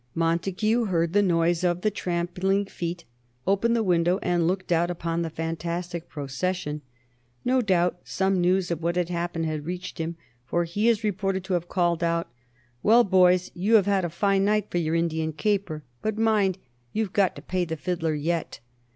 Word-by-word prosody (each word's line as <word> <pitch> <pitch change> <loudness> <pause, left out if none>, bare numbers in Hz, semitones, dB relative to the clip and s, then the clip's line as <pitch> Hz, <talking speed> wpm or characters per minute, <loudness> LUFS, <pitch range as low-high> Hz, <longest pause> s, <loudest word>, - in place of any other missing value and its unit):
Montague 190 +8 +1
heard 170 -4 0
the 205 - +5
noise 170 -2 +2
of 175 0 +1
the 215 - +1
trampling 185 +2 -1
feet, 175 -2 -5 0.4
opened 200 +5 +2
the 230 - +1
window 175 -1 +2
and 175 -2 +1
looked 185 0 -2
out 170 +1 +3
upon 170 -1 -2
the 165 - -2
fantastic 170 +2 -4
procession. 150 +2 -3 0.6
No 255 +1 +3
doubt 180 -4 +1
some 190 -1 0
news 180 0 +2
of 170 -1 -2
what 170 +1 0
had 180 -1 0
happened 170 -1 -2
had 155 -2 -3
reached 180 +1 -5
him, 165 +1 -3 0.3
for 170 +7 0
he 205 +7 0
is 225 -1 +1
reported 195 -2 -1
to 190 0 -3
have 175 -1 -1
called 175 -2 +1
out: 170 -4 0 0.5
"Well, 235 +3 +6
boys, 185 -2 +4
you 200 +6 +2
have 205 -4 +6
had 200 -2 +2
a 175 - -1
fine 195 +4 +1
night 210 0 +1
for 175 - +1
your 160 -1 0
Indian 160 -1 0
caper. 190 -4 -1 0.2
But 215 0 -2
mind, 210 -4 +2 0.4
you've 215 -3 -1
got 195 -3 +2
to - - -10
pay 185 -1 -1
the 160 -1 -4
fiddler 165 -1 -1
yet." 165 +3 -2
175 Hz, 185 wpm, -26 LUFS, 170-195 Hz, 0.6 s, Well